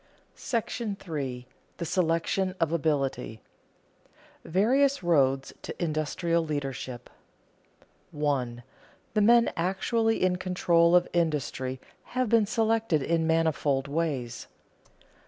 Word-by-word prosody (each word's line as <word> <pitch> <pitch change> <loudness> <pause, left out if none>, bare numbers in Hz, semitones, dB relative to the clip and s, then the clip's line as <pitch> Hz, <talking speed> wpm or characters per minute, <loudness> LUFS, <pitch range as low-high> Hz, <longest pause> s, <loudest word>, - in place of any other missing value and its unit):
§ 225 -4 -3
III. 125 -2 -5 0.3
THE 170 - -4
SELECTION 180 +2 0
OF 165 -2 +1
ABILITY 145 -7 0
[Sidenote: 110 - -18 1.1
Various 260 - +3
roads 135 -5 +2
to - - -8
industrial 165 +1 0
leadership] 135 -5 -4 1.0
1. 130 -5 -2 0.5
_The 210 -1 +3
men 235 +2 +5
actually 225 +6 0
in 180 -1 +2
control 175 -2 +3
of 175 0 +4
industry 145 -6 -1 0.4
have 255 -3 +1
been 225 -2 +4
selected 225 - +1
in 165 +1 +1
manifold 155 -4 +1
ways. 140 -6 -3
165 Hz, 100 wpm, -27 LUFS, 140-195 Hz, 1.1 s, men